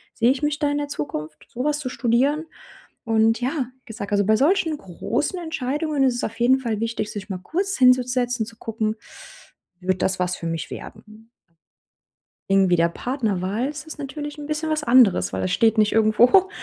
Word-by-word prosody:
Sehe 235 Hz, +2 st, +3 dB
ich 270 Hz, -, -2 dB
mich 295 Hz, 0 st, 0 dB
da 295 Hz, -1 st, 0 dB
in 290 Hz, -, -1 dB
der 290 Hz, -, -3 dB
Zukunft, 150 Hz, -, -6 dB
sowas 290 Hz, +5 st, -1 dB
zu 280 Hz, -4 st, -4 dB
studieren?“ 255 Hz, +6 st, +1 dB, 0.6 s
Und 225 Hz, 0 st, +3 dB
ja, 255 Hz, +1 st, -1 dB
wie -, -, -48 dB
gesagt, 210 Hz, -3 st, -7 dB
also 205 Hz, -1 st, +3 dB
bei 215 Hz, +2 st, +4 dB
solchen 320 Hz, -, +2 dB
großen 235 Hz, -, -3 dB
Entscheidungen 300 Hz, -2 st, -2 dB
ist 255 Hz, -2 st, +2 dB
es 240 Hz, -, -3 dB
auf 225 Hz, -, -4 dB
jeden 250 Hz, +2 st, +4 dB
Fall 230 Hz, -5 st, -2 dB
wichtig, 225 Hz, -2 st, -3 dB
sich 205 Hz, -2 st, -7 dB
mal 190 Hz, -, -3 dB
kurz 380 Hz, -, -2 dB
hinzusetzen 250 Hz, -2 st, +3 dB
zu 230 Hz, -, -12 dB
gucken: 220 Hz, -1 st, -2 dB, 0.8 s
„Wird 185 Hz, 0 st, -1 dB
das 190 Hz, 0 st, +1 dB
was 180 Hz, 0 st, 0 dB
für 170 Hz, -, -6 dB
mich 165 Hz, -1 st, -4 dB
werden?“ 215 Hz, +1 st, -11 dB, 1.2 s
Irgendwie 195 Hz, -2 st, +4 dB
der 170 Hz, 0 st, +3 dB
Partnerwahl 215 Hz, 0 st, -2 dB
ist 295 Hz, -1 st, -6 dB
es 300 Hz, -, -16 dB
ist -, -, -18 dB
natürlich 295 Hz, +1 st, -6 dB
'n 295 Hz, -, -7 dB
bisschen 305 Hz, +1 st, -2 dB
was 310 Hz, -1 st, -1 dB
anderes, 220 Hz, -, +4 dB
weil 95 Hz, -, -2 dB
da 95 Hz, -, 0 dB
steht 225 Hz, -, +2 dB
nicht 215 Hz, -1 st, +3 dB
irgendwo 230 Hz, -, +5 dB
240 Hz, 190 wpm, -23 LUFS, 210-290 Hz, 1.2 s, irgendwo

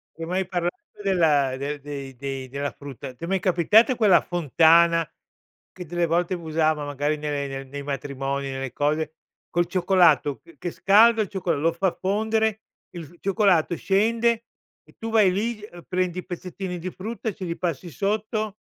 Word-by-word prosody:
Ti 165 Hz, -, -7 dB
ho -, -, -5 dB
mai 185 Hz, +2 st, 0 dB
parlato 175 Hz, -1 st, -2 dB, 0.2 s
della 155 Hz, -9 st, +2 dB
del 145 Hz, +2 st, -4 dB
dei 140 Hz, -2 st, -7 dB
dei 135 Hz, 0 st, -5 dB
della 140 Hz, +2 st, -3 dB
frutta? 135 Hz, -2 st, -9 dB
Ti 125 Hz, -, -14 dB
è -, -, -3 dB
mai 190 Hz, +1 st, +1 dB
capitato 195 Hz, -, +4 dB
quella 210 Hz, -6 st, +5 dB
fontana, 165 Hz, 0 st, +4 dB, 0.6 s
che 180 Hz, -, -9 dB
delle 175 Hz, +1 st, 0 dB
volte 170 Hz, +2 st, 0 dB
usavano 155 Hz, -2 st, 0 dB
magari 145 Hz, +1 st, -1 dB
nelle 145 Hz, -1 st, -3 dB
nei 135 Hz, 0 st, -6 dB
nei 140 Hz, +2 st, -7 dB
matrimoni, 140 Hz, 0 st, -3 dB
nelle 135 Hz, -2 st, -5 dB
cose, 155 Hz, +2 st, 0 dB, 0.4 s
col 175 Hz, 0 st, +1 dB
cioccolato 175 Hz, -7 st, +3 dB
che 165 Hz, -3 st, -19 dB
che 175 Hz, +6 st, -4 dB
scaldo 220 Hz, +5 st, +5 dB
il 210 Hz, -, -1 dB
cioccol 180 Hz, -6 st, -1 dB
lo 165 Hz, +2 st, +3 dB
fa 185 Hz, +2 st, +1 dB
fondere, 220 Hz, +2 st, 0 dB, 0.3 s
il 175 Hz, -1 st, -10 dB
cioccolato 190 Hz, -4 st, +2 dB
scende 230 Hz, +5 st, +1 dB, 0.4 s
e -, -, -23 dB
tu 225 Hz, -, -5 dB
vai 215 Hz, -4 st, +5 dB
lì, 215 Hz, +3 st, -2 dB
ehm, 175 Hz, -5 st, -11 dB
prendi 185 Hz, -1 st, -1 dB
pezzettini 180 Hz, 0 st, -6 dB
di 180 Hz, +2 st, -4 dB
frutta 220 Hz, +5 st, -5 dB
e 210 Hz, -, -7 dB
ce 185 Hz, -, -6 dB
li 170 Hz, -1 st, -4 dB
passi 175 Hz, -1 st, -3 dB
sotto. 215 Hz, -, -2 dB
175 Hz, 175 wpm, -24 LUFS, 145-195 Hz, 0.6 s, quella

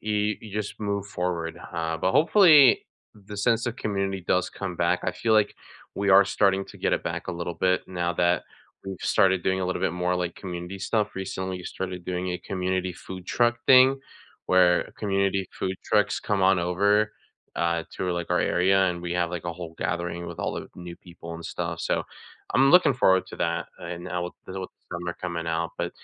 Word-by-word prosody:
you 105 Hz, -1 st, 0 dB
you 105 Hz, -3 st, -11 dB
just 105 Hz, -1 st, -4 dB
move 100 Hz, -1 st, -2 dB
forward, 90 Hz, -3 st, -3 dB, 0.2 s
uh, 80 Hz, -1 st, -2 dB
but 95 Hz, +3 st, 0 dB
hopefully, 155 Hz, -, +6 dB, 0.3 s
the 105 Hz, 0 st, -11 dB
sense 115 Hz, +3 st, +2 dB
of 120 Hz, 0 st, -3 dB
community 100 Hz, -3 st, -2 dB
does 90 Hz, 0 st, +2 dB
come 95 Hz, -3 st, -5 dB
back, 85 Hz, +1 st, +1 dB
I 90 Hz, -, -1 dB
feel 110 Hz, +5 st, 0 dB
like 105 Hz, -1 st, +3 dB, 0.4 s
we 100 Hz, 0 st, 0 dB
are 95 Hz, +1 st, +8 dB
starting 95 Hz, -1 st, +2 dB
to -, -, -13 dB
get -, -, 0 dB
it -, -, +1 dB
back -, -, -4 dB
a -, -, -1 dB
little 85 Hz, 0 st, -4 dB
bit 90 Hz, +1 st, +1 dB
now 90 Hz, -1 st, -1 dB
that 85 Hz, -1 st, +2 dB, 0.4 s
we've 95 Hz, -, -5 dB
started 95 Hz, -2 st, +3 dB
doing 95 Hz, 0 st, 0 dB
a 90 Hz, -, -1 dB
little 90 Hz, -1 st, -2 dB
bit 95 Hz, -, +1 dB
more, 90 Hz, 0 st, 0 dB
like, 90 Hz, -1 st, -2 dB
community 90 Hz, +1 st, -6 dB
stuff, 105 Hz, +2 st, -1 dB
recently, 95 Hz, -1 st, -4 dB
we 90 Hz, -, -10 dB
started 90 Hz, -1 st, -5 dB
doing 90 Hz, 0 st, -3 dB
a 90 Hz, -, -3 dB
community 95 Hz, 0 st, -2 dB
food 90 Hz, +1 st, -9 dB
truck 120 Hz, 0 st, +2 dB
thing, 130 Hz, +1 st, +7 dB, 0.5 s
where 90 Hz, -2 st, +4 dB
community 100 Hz, -2 st, 0 dB
food 95 Hz, 0 st, -1 dB
trucks 105 Hz, -1 st, +2 dB
come 100 Hz, -2 st, 0 dB
on 95 Hz, -1 st, +5 dB
over, 100 Hz, +5 st, +2 dB, 0.4 s
uh, 85 Hz, -1 st, 0 dB
tour, 90 Hz, -1 st, -2 dB
like, 85 Hz, -1 st, -3 dB
our 90 Hz, -, +3 dB
area, 95 Hz, +2 st, +3 dB
and 85 Hz, -, -5 dB
we 85 Hz, 0 st, -3 dB
have, 90 Hz, -1 st, 0 dB
like, 90 Hz, -2 st, -5 dB
a 85 Hz, -, -3 dB
whole 85 Hz, -2 st, -8 dB
gathering 85 Hz, 0 st, -3 dB
with 85 Hz, -1 st, -8 dB
all -, -, -2 dB
the -, -, -6 dB
new 90 Hz, -1 st, -8 dB
people 85 Hz, -2 st, -11 dB
and 85 Hz, -, -9 dB
stuff, -, -, -4 dB
so, -, -, 0 dB, 0.5 s
I'm 135 Hz, +1 st, +5 dB
looking 175 Hz, -5 st, +6 dB
forward 95 Hz, -6 st, +3 dB
to -, -, -9 dB
that, 85 Hz, +1 st, -1 dB
and 85 Hz, 0 st, -7 dB
I 90 Hz, -, -1 dB
will 90 Hz, 0 st, -4 dB
deal 95 Hz, +1 st, -6 dB
with 95 Hz, -, -5 dB
the 85 Hz, -, -9 dB
summer 85 Hz, 0 st, -4 dB
coming 85 Hz, -2 st, -4 dB
out, 85 Hz, 0 st, -1 dB
but, -, -, -2 dB
95 Hz, 210 wpm, -26 LUFS, 85-100 Hz, 0.5 s, are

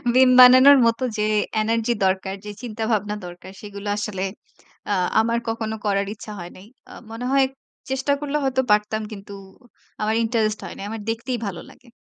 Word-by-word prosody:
মিম 260 Hz, 0 st, +6 dB
বানানোর 255 Hz, +3 st, +9 dB
মতো 230 Hz, +2 st, 0 dB
যে 210 Hz, -, 0 dB, 0.4 s
এনার্জি 230 Hz, +2 st, 0 dB
দরকার, 190 Hz, 0 st, 0 dB
যে 210 Hz, -, -5 dB
চিন্তাভাবনা 220 Hz, -3 st, -2 dB
দরকার 175 Hz, +1 st, -10 dB
সেগুলো 205 Hz, -1 st, -8 dB
আসলে 205 Hz, -2 st, -3 dB, 0.7 s
আ -, -, +3 dB, 0.3 s
আমার 230 Hz, +1 st, 0 dB
কখনো 225 Hz, -1 st, -3 dB
করার 200 Hz, -1 st, +1 dB
ইচ্ছা 215 Hz, 0 st, -10 dB
হয় 175 Hz, 0 st, -8 dB
নাই। 185 Hz, -, -14 dB, 0.3 s
অ -, -, -11 dB, 0.2 s
মনে 230 Hz, +2 st, -6 dB
হয় 275 Hz, -1 st, +4 dB, 0.4 s
চেষ্টা 265 Hz, +2 st, -1 dB
করলে 295 Hz, 0 st, -2 dB
হয়তো 265 Hz, -1 st, +1 dB
পারতাম 210 Hz, +1 st, +2 dB
কিন্তু 200 Hz, -1 st, -9 dB, 0.7 s
আমার 215 Hz, +1 st, 0 dB
ইন্টারেস্ট 220 Hz, -2 st, 0 dB
হয় -, -, -8 dB
নাই। 195 Hz, -, -6 dB
আমার 220 Hz, 0 st, -6 dB
দেখতেই 235 Hz, +3 st, -2 dB
ভালো 180 Hz, -4 st, -6 dB
লাগে। 250 Hz, -, -19 dB
220 Hz, 170 wpm, -22 LUFS, 205-245 Hz, 0.7 s, বানানোর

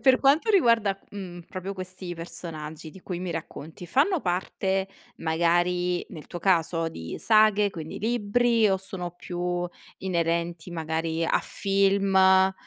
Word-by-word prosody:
per 260 Hz, -1 st, +5 dB
quanto 290 Hz, +10 st, +4 dB
riguarda, 230 Hz, -, +4 dB
mhmm, 180 Hz, -4 st, -7 dB
proprio 190 Hz, 0 st, -5 dB
questi 185 Hz, -1 st, -6 dB
personaggi 160 Hz, -2 st, -7 dB
di 190 Hz, -, -14 dB
cui 180 Hz, -1 st, -5 dB
mi 180 Hz, -1 st, -4 dB
racconti, 165 Hz, +1 st, -7 dB
fanno 295 Hz, -, +2 dB
parte, 190 Hz, +1 st, -1 dB, 0.3 s
magari 175 Hz, +2 st, +1 dB
nel 155 Hz, -4 st, -9 dB
tuo 175 Hz, -, -6 dB
caso, 165 Hz, -2 st, +2 dB
di 80 Hz, -, -7 dB
saghe, 215 Hz, -2 st, +4 dB
quindi 160 Hz, -3 st, -7 dB
libri, 230 Hz, 0 st, +2 dB
o 190 Hz, -, +3 dB
sono 185 Hz, -2 st, -6 dB
più 175 Hz, 0 st, -3 dB, 0.3 s
inerenti 170 Hz, -1 st, -1 dB
magari 160 Hz, 0 st, -2 dB
a -, -, +2 dB
film 195 Hz, 0 st, +1 dB
uhm, 190 Hz, 0 st, +6 dB
180 Hz, 135 wpm, -26 LUFS, 170-200 Hz, 0.3 s, uhm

